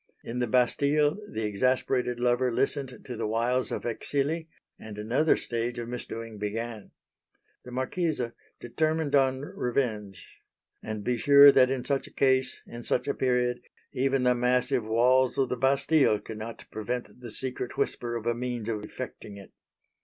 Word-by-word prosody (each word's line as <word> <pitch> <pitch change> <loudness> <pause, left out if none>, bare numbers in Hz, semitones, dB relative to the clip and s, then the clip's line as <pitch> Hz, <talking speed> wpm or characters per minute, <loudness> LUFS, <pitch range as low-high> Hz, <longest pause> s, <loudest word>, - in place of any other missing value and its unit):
In 120 +2 -4
the 125 - 0
Bastille 145 - +2
the 110 - -3
exasperated 125 +3 0
lover 125 +1 +2
listened 135 +1 -2
to 125 - -6
the 110 -1 -2
wiles 120 +4 0
of - - -3
Exili; 145 +7 -2 0.3
and 110 -1 -9
another 120 +9 +2
stage 120 +1 -3
of 120 0 -5
misdoing 115 -2 -6
began. 110 +1 -4 0.8
The 125 - -9
Marquise 150 +6 -1 0.4
determined 155 +4 -1
on 130 -1 +3
revenge, 110 -8 -3 0.4
and 110 -1 -5
be 120 +2 0
sure 140 +3 +9
that 130 -2 +5
in 130 -2 -2
such 140 -1 -1
a - - -15
case 130 -1 +1
in 120 - -9
such 125 - -1
a 140 - +1
period 125 -1 0 0.3
even 135 0 +1
the 125 0 +4
massive 125 +1 +1
walls 125 +4 +3
of 135 -2 +1
the - - -1
Bastille 135 -2 +3
could 110 0 -8
not 115 +1 -7
prevent 120 +3 -5
the 120 -1 -8
secret 125 +2 -4
whisper 120 -1 -1
of 115 -1 -5
a 120 - +2
means 120 -2 -4
of 105 -2 -3
effecting 105 -2 -8
it. 100 - -13
125 Hz, 160 wpm, -28 LUFS, 115-135 Hz, 0.8 s, sure